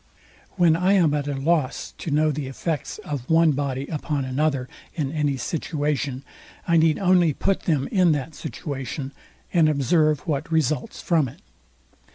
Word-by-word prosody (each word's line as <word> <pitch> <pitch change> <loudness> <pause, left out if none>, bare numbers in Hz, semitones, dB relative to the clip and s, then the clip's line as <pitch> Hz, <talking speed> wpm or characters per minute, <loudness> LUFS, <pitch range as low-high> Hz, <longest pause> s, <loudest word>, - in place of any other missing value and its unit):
When 175 -4 +4
I 180 +3 +2
am 170 -7 +4
at 145 -1 -1
a 145 - -2
loss 145 0 0
to - - -4
know 155 +1 +2
the 145 -2 -4
effects 150 +3 -3
of 140 -4 -5
one 165 -1 +5
body 140 -1 -2
upon 150 -2 -2
another 135 0 0 0.3
in 145 -4 -2
any 150 -3 0
situation, 145 -1 -2 0.4
I 170 -1 +4
need 160 -1 +4
only 180 -4 +3
put 195 +7 -1
them 145 -5 +1
in 180 -4 +4
that 145 +2 -3
situation, 135 -2 -5 0.4
and 165 -3 +5
observe 150 +1 +2
what 155 -1 -3
results 160 - 0
from 160 -5 +2
it. 120 - -12
150 Hz, 160 wpm, -24 LUFS, 140-165 Hz, 0.4 s, one